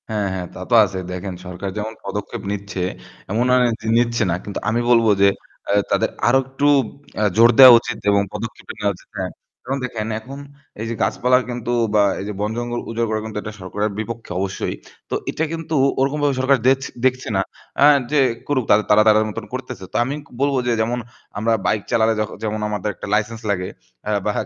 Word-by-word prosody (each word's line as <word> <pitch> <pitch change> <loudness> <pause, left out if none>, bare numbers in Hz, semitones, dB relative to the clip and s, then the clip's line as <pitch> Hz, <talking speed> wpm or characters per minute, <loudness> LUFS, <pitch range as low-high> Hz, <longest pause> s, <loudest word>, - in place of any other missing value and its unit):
হ্যাঁ, 105 -2 -1
হ্যাঁ, 90 -1 -4
তা - - -9
তো - - 0
আ - - +7
ছে। 95 - -3
দেখেন 90 +1 -5
সরকার 90 +2 -5
যেমন 110 +1 -3
পদক্ষেপ 105 -1 -5
নিচ্ছে 100 -1 -4 0.5
এমন 115 +3 +1
না - - +6
নে - - +4
যে 110 - -6
নিচ্ছে 120 -1 +2
না। - - +1
কিন্তু 100 - -5
আমি 115 +2 +1
বলবো 115 -2 +5
যে 100 - +7 0.4
আ - - +2 0.2
তাদের - - +2 0.2
আরও 130 +3 +5
একটু 135 +2 -1 0.5
আ - - +3
জোর 115 +1 +8
দেওয়া 130 -2 +12
উচিত 120 -1 -5
এবং 100 0 +4
পদক্ষেপ 105 +1 -7
এ - - -8
নেওয়া 100 -1 +1
উচিত, - - -21
হ্যাঁ। - - -3 0.3
যেমন 135 +2 -2
দেখেন 110 -3 -4
এখন 135 +5 -10 0.4
এইযে 115 +1 -3
গাছপালা 125 +1 +3
কিন্তু 120 -1 -3 0.2
বা 105 - +5 0.2
এই 95 - -5
যে 105 - -4
বন-জঙ্গল 120 +3 -2
উজাড় 115 0 -1
করা 110 0 0
কিন্তু 110 -1 -6
এটা 110 - -6
সরকারের 105 +3 -2
বিপক্ষে 115 -1 -6
অবশ্যই। 95 -8 -2 0.3
তো - - -1
এটা 160 - -1
কিন্তু 165 -1 -3 0.2
ওরকমভাবে 140 +1 +1
সরকার 135 +1 +4
দেছে 135 0 +2 0.2
দেখছে 130 0 +1
না 95 - +3 0.4
আ - - +7 0.3
যে 150 - +3 0.3
করুক, 140 -3 +1 0.3
তারা 105 +1 +7
তাদের 110 0 +5
মতন 105 +1 -6
করতেছে। 130 -5 -6
তো - - -15
আমি 145 +4 -4 0.2
বলবো 140 -1 +2
যে - - +2
যেমন 120 +2 -1 0.4
আমরা 115 +2 +1
bike 105 -2 0
চালালে 110 0 +3
যক 105 0 -1
যেমন 110 0 -2
আমাদের 105 0 -2
একটা - - -8
license 110 +2 -2
লাগে 90 -2 -1 0.4
অ্যা 105 - -1
বা 105 - +2
110 Hz, 205 wpm, -21 LUFS, 105-125 Hz, 0.5 s, দেওয়া